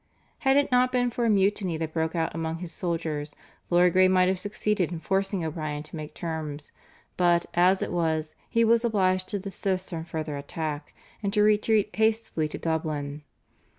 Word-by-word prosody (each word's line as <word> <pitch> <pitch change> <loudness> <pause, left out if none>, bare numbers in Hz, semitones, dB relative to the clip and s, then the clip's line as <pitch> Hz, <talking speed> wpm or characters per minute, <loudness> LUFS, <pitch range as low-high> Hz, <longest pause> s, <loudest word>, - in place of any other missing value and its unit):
Had 270 0 +3
it 285 - +2
not 250 0 +4
been 245 -1 +1
for 240 0 -1
a - - +3
mutiny 195 -4 +2
that 160 -1 -4
broke 160 +1 -1
out 165 -1 0
among 165 0 -3
his 170 -1 -7
soldiers 160 -5 -3 0.3
Lord 175 0 +4
Grey 185 0 +6
might 185 0 +4
have 190 -1 0
succeeded 205 -2 -1
in 170 - -4
forcing 195 -1 -1
O'Brien 155 -2 -4
to 155 - -9
make 155 -1 -7
terms, 155 -3 -5 0.5
but, 175 -1 +3
as 180 +2 +4
it - - -4
was, 160 -2 0 0.2
he 230 - +3
was 230 +1 +4
obliged 185 -5 +1
to 205 - -1
desist 190 -1 -3
from 165 -1 -4
further 155 -3 -4
attack 145 +1 -5 0.3
and 200 -2 -1
to 210 -1 +4
retreat 210 0 +2
hastily 220 -7 +1
to - - -6
Dublin. 150 -3 -2
175 Hz, 185 wpm, -27 LUFS, 160-205 Hz, 0.5 s, Grey